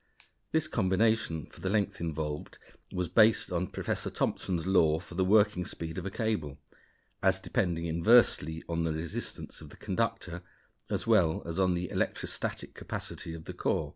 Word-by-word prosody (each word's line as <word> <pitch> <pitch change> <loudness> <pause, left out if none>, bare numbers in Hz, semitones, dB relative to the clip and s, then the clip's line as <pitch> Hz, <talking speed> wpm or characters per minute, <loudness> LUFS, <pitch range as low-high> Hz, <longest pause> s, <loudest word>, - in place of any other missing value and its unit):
This 160 -1 +2
combination 95 - +1
for - - -16
the 95 - -1
length 100 -2 0
involved 75 -2 -3 0.3
was 90 -1 -1
based 110 -1 +4
on 90 +1 0
Professor - - -2
Thomson's 85 -3 -1
law 80 -5 +4
for 90 - -12
the 95 +2 +1
working 105 -1 +4
speed 80 0 -5
of 95 - -5
a - - -1
cable, 95 - -2 0.6
as 95 -1 +4
depending 90 -5 -1
inversely 85 -2 +4
on 85 0 -1
the 80 -1 0
resistance 85 +9 -5
of - - -10
the - - -14
conductor 95 -4 -2 0.5
as - - -1
well 80 -1 +3
as 85 +2 -3
on 90 -1 +3
the 90 0 -3
electrostatic - - -2
capacity 80 - -6
of 80 - -10
the - - -6
core. - - 0
90 Hz, 165 wpm, -30 LUFS, 80-105 Hz, 0.6 s, based